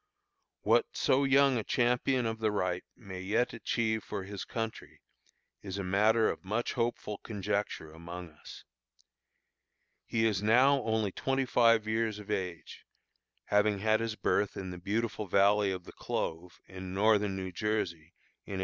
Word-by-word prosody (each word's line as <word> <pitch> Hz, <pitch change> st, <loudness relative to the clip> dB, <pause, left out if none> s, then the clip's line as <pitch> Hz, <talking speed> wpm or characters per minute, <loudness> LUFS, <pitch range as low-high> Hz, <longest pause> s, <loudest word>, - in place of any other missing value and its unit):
What -, -, +3 dB
so 135 Hz, +2 st, +3 dB
young 135 Hz, -2 st, +4 dB
a -, -, -3 dB
champion 125 Hz, +2 st, +1 dB
of 115 Hz, 0 st, -2 dB
the 110 Hz, -1 st, +1 dB
right 90 Hz, -3 st, -1 dB
may 95 Hz, -5 st, -8 dB
yet 110 Hz, +6 st, 0 dB
achieve 110 Hz, 0 st, -1 dB
for 100 Hz, -2 st, -5 dB
his 100 Hz, 0 st, -6 dB
country, 115 Hz, -1 st, -5 dB, 0.6 s
is 95 Hz, -1 st, -6 dB
a 100 Hz, -, -3 dB
matter 110 Hz, +4 st, +3 dB
of -, -, -3 dB
much 110 Hz, +5 st, -2 dB
hopeful 115 Hz, -3 st, -2 dB
conjecture 100 Hz, -6 st, -3 dB
among 85 Hz, +1 st, -8 dB
us. 75 Hz, -, -12 dB, 1.4 s
He 115 Hz, -1 st, +1 dB
is 105 Hz, -3 st, +1 dB
now 130 Hz, +6 st, +5 dB
only 110 Hz, -3 st, 0 dB
twenty 135 Hz, +6 st, -1 dB
five 115 Hz, -3 st, +4 dB
years 110 Hz, -1 st, 0 dB
of 105 Hz, 0 st, -8 dB
age, 90 Hz, -5 st, -4 dB, 0.6 s
having 105 Hz, 0 st, +2 dB
had 110 Hz, +2 st, +2 dB
his 115 Hz, -1 st, -2 dB
birth 105 Hz, -2 st, 0 dB
in 95 Hz, -1 st, -5 dB
the 90 Hz, -, -7 dB
beautiful 105 Hz, +2 st, -2 dB
valley 100 Hz, +2 st, +4 dB
of 90 Hz, -1 st, -5 dB
the -, -, -12 dB
Clove, 85 Hz, +2 st, -4 dB
in 95 Hz, 0 st, -8 dB
Northern 105 Hz, -1 st, +3 dB
New 95 Hz, -1 st, -4 dB
Jersey, 90 Hz, -5 st, -2 dB, 0.3 s
in -, -, -8 dB
1838. -, -, -3 dB
105 Hz, 160 wpm, -31 LUFS, 95-115 Hz, 1.4 s, now